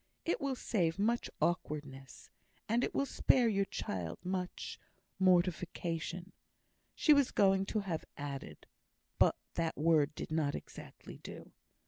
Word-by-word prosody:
It 335 - 0
will 275 -1 0
save 175 -9 0
much 230 +4 +1
awkwardness, 145 -6 -3 0.4
and 235 +3 +2
it - - -2
will 275 - +2
spare 255 -2 +3
your 200 -3 +2
child 85 - -4
much 180 0 -3 0.2
" - - -47
Mortification 175 0 0 0.6
she 305 - +6
was 285 -3 +4
going 195 -1 +3
to 215 - 0
have 175 -5 -3
added, 140 - -6 0.5
but - - +5 0.2
that 165 -1 -1
word 155 -2 +3
did - - -6
not 155 -3 +1
exactly - - -10
do. - - -10
180 Hz, 135 wpm, -34 LUFS, 155-205 Hz, 0.6 s, she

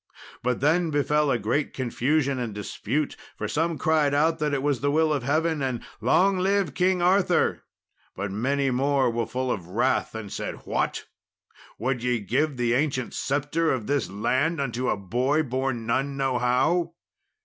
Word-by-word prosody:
But 125 0 -1
then 165 +4 +3
befell 150 0 +1
a 125 - +2
great 120 +7 -1
confusion 135 +2 0
and 115 -4 -4
dispute, 125 +7 -2 0.2
for 105 - -3
some 160 +8 0
cried 150 -3 +2
out 160 +2 +2
it 145 -3 0
was 145 -4 0
the 145 - +1
will 155 +1 +2
of 145 - -1
Heaven, 155 +4 0
and, 130 -3 -2 0.2
"Long 185 - +3
live 195 -4 +1
King 180 +1 +2
Arthur," 185 +2 +3 0.5
but 100 +1 -4
many 135 +6 0
more 135 0 +2
were 115 -1 -2
full 130 0 -2
of 90 -7 -4
wrath 105 +3 0
and 110 -3 -6
said, - - -5
"What! - - -1 0.7
would 125 +2 -1
ye 125 -1 0
give 130 +7 0
the 120 -1 +1
ancient 130 -2 0
sceptre 145 +4 0
of 125 -5 -2
this 140 -6 0
land 130 - 0
unto 125 -2 -1
a - - +1
boy 125 - 0
born 130 -3 -2
none 135 +4 -1
know 135 -2 0
how?" 165 +8 +1
135 Hz, 170 wpm, -25 LUFS, 120-155 Hz, 0.7 s, then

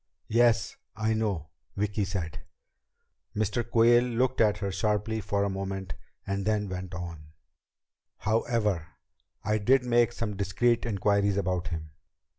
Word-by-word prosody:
"Yes, 115 -1 +3 0.2
I 110 +1 +1
know," 100 -8 -1 0.3
Vicki 105 0 0
said. 90 -5 -4 1.0
Mr. 110 +2 0
Quayle 120 +1 +5
looked 125 +1 +1
at 105 -2 +4
her 100 -2 -2
sharply 105 +2 0
for 100 0 0
a - - +1
moment 95 -1 -4 0.3
and 100 0 -2
then 105 -1 0
went 90 0 -5
on: 85 -3 -7 0.8
"However, 105 -5 0 0.6
I 105 +1 +1
did 125 +5 +4
make 120 -1 +3
some 115 -3 -3
discreet 110 +5 +1
inquiries 100 -1 +2
about 90 -2 0
him. 80 -3 -5
105 Hz, 130 wpm, -28 LUFS, 95-115 Hz, 1.0 s, Quayle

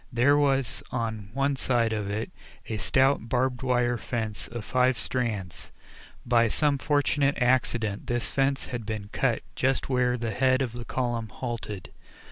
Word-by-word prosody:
There 125 +4 +4
was 135 -3 +1
on 110 -4 -3
one 140 +1 +1
side 120 -4 +1
of 105 -2 -2
it 110 +2 -3 0.3
a 110 - -3
stout 130 0 +2
barbed 125 0 +1
wire 120 -2 +1
fence 110 -3 -3
of 115 -2 -7
five 130 -1 +2
strands. 105 -10 -3 0.5
By 120 -1 +4
some 145 +4 +1
fortunate 145 0 +2
accident 120 -3 +1
this 120 -2 -1
fence 135 0 +1
had 120 -2 -4
been 105 -1 -5
cut 120 0 0
just 135 +1 0
where 125 -1 +2
the 115 -1 -2
head 130 +4 +3
of 125 - -3
the 120 0 -7
column 120 -3 -2
halted. 110 -5 -5
120 Hz, 155 wpm, -27 LUFS, 110-130 Hz, 0.5 s, There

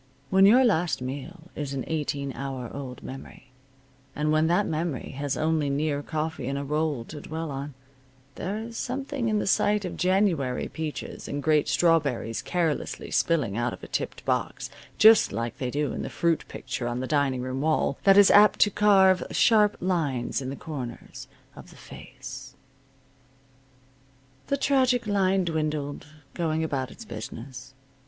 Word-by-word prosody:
When 195 +1 +6
your 250 +5 +6
last 175 -7 +1
meal 145 +7 -7
is 140 -2 -4
an 135 - -2
eighteen 145 -3 -3
hour 135 -3 -5
old 130 -3 -7
memory, 135 0 -10 0.6
and 150 +1 0
when 155 +1 +3
that 175 +5 +2
memory 160 -3 -3
has 140 +1 -3
only 155 -2 +1
near 145 +1 0
coffee 155 -3 -3
and 140 +1 -2
a 140 - -3
roll 150 -4 -1
to 150 +2 -9
dwell 160 0 -5
on, 140 0 -6 0.6
there 195 +4 -4
is 225 +1 -7
something 265 -1 -3
in 215 - +1
the - - -1
sight 205 +1 +2
of 180 - -5
January 180 -9 +1
peaches 160 -2 -6
and 145 0 -4
great 155 -2 +3
strawberries 145 -9 +1
carelessly 170 -4 -2
spilling 145 -12 +1
out 120 +1 -1
of - - -11
a - - -7
tipped - - -4
box, - - -2 0.3
just 220 0 +7
like 115 0 -4
they 125 - -2
do 145 +3 -1
in - - -4
the - - -4
fruit 170 -2 0
picture 120 - -5
on 120 +1 -2
the 130 - -2
dining 140 -3 +1
room 130 +1 -3
wall, 155 -2 +1
that 195 0 +6
is 205 -1 +8
apt 210 +1 +7
to 205 - +5
carve 190 -2 +5
sharp 210 -3 +4
lines 145 -9 -1
in 130 - -4
the 135 - -4
corners 130 -6 -7 0.3
of - - -12
the - - -15
face. 135 0 -10 1.9
The 280 - 0
tragic 260 -3 +2
line 195 -2 +2
dwindled, 155 -3 -2 0.3
going 160 -2 -1
about 135 -5 -2
its 230 - -11
business. 125 - -8
155 Hz, 165 wpm, -26 LUFS, 135-185 Hz, 1.9 s, is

